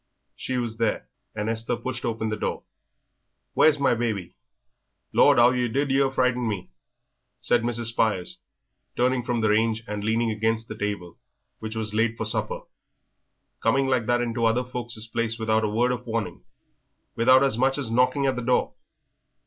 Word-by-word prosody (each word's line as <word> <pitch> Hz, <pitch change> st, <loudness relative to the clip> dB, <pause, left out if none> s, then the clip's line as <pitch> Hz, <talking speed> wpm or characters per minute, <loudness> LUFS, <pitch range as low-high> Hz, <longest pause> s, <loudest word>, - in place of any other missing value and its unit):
She 130 Hz, -, -3 dB
was 115 Hz, -2 st, -3 dB
there, 115 Hz, -2 st, 0 dB, 0.3 s
and 105 Hz, +1 st, -3 dB
Esther 115 Hz, +1 st, 0 dB
pushed 125 Hz, +1 st, -4 dB
open 110 Hz, -1 st, -2 dB
the 110 Hz, -, -1 dB
door. -, -, -3 dB, 0.9 s
"Where's 155 Hz, -1 st, +5 dB
my 140 Hz, -3 st, +2 dB
baby?" 110 Hz, -7 st, -2 dB, 0.8 s
"Lord, -, -, +5 dB
'ow 120 Hz, +1 st, +6 dB
yer 125 Hz, -1 st, 0 dB
did 135 Hz, +2 st, +1 dB
frighten 125 Hz, -1 st, +1 dB
me!" 95 Hz, -7 st, -4 dB, 0.7 s
said 120 Hz, -, +2 dB
Mrs. 120 Hz, -1 st, -1 dB
Spires, 105 Hz, -6 st, -1 dB, 0.6 s
turning 125 Hz, +1 st, +2 dB
from 120 Hz, -1 st, -2 dB
the 110 Hz, -, +2 dB
range 110 Hz, +1 st, +1 dB
and 105 Hz, -1 st, -4 dB
leaning 115 Hz, +1 st, +1 dB
against 110 Hz, +1 st, -1 dB
the 110 Hz, -, -7 dB
table, 100 Hz, -5 st, -4 dB, 0.4 s
which 110 Hz, 0 st, -6 dB
was 110 Hz, -1 st, -3 dB
laid 115 Hz, +1 st, +1 dB
for 110 Hz, -, -3 dB
supper. 105 Hz, -, -1 dB, 1.0 s
"Coming 135 Hz, +4 st, +2 dB
like 130 Hz, -4 st, 0 dB
that 120 Hz, 0 st, +2 dB
into 115 Hz, -1 st, -2 dB
other 115 Hz, +2 st, +2 dB
folk's 120 Hz, -3 st, -6 dB
places 115 Hz, 0 st, -2 dB
without 110 Hz, 0 st, +1 dB
a 105 Hz, -, +1 dB
word 120 Hz, +4 st, +1 dB
of 125 Hz, 0 st, -5 dB
warning 110 Hz, -, -4 dB, 0.7 s
without 130 Hz, +3 st, +5 dB
as 135 Hz, -5 st, +3 dB
much 135 Hz, +3 st, +1 dB
as 135 Hz, -6 st, -2 dB
knocking 125 Hz, +3 st, +2 dB
at 135 Hz, -1 st, +1 dB
the 125 Hz, -, -3 dB
door." 125 Hz, +1 st, +1 dB
115 Hz, 170 wpm, -25 LUFS, 110-125 Hz, 1.0 s, ow